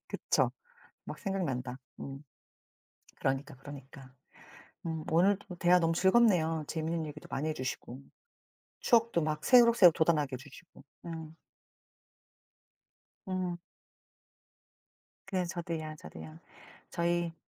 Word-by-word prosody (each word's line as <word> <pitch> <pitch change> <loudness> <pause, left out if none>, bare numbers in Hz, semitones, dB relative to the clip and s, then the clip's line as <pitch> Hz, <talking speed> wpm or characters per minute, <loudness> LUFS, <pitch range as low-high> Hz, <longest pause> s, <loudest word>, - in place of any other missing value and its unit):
그쵸. - - +1 0.5
막 - - -7
생각난다. 135 - -2 0.2
음. 135 +1 -7 1.0
그러니까, 135 +2 -1
그러니까. 135 -1 -11 0.8
음. 160 -1 -3
오늘도 190 +3 +2
대화 175 +1 +5
너무 165 -1 +2
즐겁네요, 175 -5 +3
재미있는 160 0 -2
얘기도 150 0 -9
많이 145 +3 -2
해 155 - 0
주시고. 130 -1 -5 0.8
추억도 230 -7 +3
막 150 -1 -2
새록새록 235 -8 +7
돋아나게 155 -4 +2
해 130 - -2
주시고. 145 +4 -15 0.2
음. 160 -1 -7 1.9
음. 185 -2 -2 1.7
그래. 185 -2 -1
저도요, 165 -3 -4
저도요. 80 0 -10 0.5
저희 170 0 0
160 Hz, 235 characters per minute, -31 LUFS, 145-180 Hz, 1.9 s, 새록새록